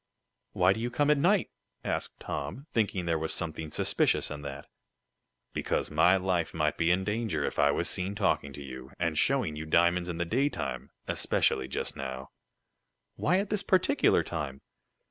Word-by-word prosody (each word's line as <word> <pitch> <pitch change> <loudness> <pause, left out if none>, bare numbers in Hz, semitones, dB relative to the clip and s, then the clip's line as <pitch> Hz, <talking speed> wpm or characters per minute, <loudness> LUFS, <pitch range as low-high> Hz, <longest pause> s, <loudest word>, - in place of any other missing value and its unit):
"Why 90 +2 +4
do 110 - -6
you 120 +2 -1
come 145 +4 +2
at 150 - +3
night?" 190 +6 +3 0.3
asked - - -3
Tom, 75 - -5
thinking 100 -5 0
there 85 -1 +1
was 80 0 -2
something 80 -2 -4
suspicious - - +1
in 75 0 -5
that. 70 0 -7 0.9
"Because - - -1
my 85 +5 +5
life 90 -3 -1
might 75 -1 +1
be 85 0 +1
in 90 +2 +3
danger 105 -7 -1
if - - -3
I 70 0 +5
was 85 +4 +1
seen 95 +2 -2
talking 75 -6 +1
to 70 +1 -8
you, 65 0 -9
and 85 -2 0
showing 115 - +2
you 80 +1 -6
diamonds 85 +2 +3
in 85 - -3
the 85 - 0
daytime 135 +10 -1 0.2
especially 65 -1 +1
just - - -3
now. 65 -1 -6 0.8
"Why 180 - +2
at 200 +1 -2
this 210 -2 +1
particular 185 -3 +3
time?" 70 -5 -4
85 Hz, 175 wpm, -29 LUFS, 75-110 Hz, 0.9 s, my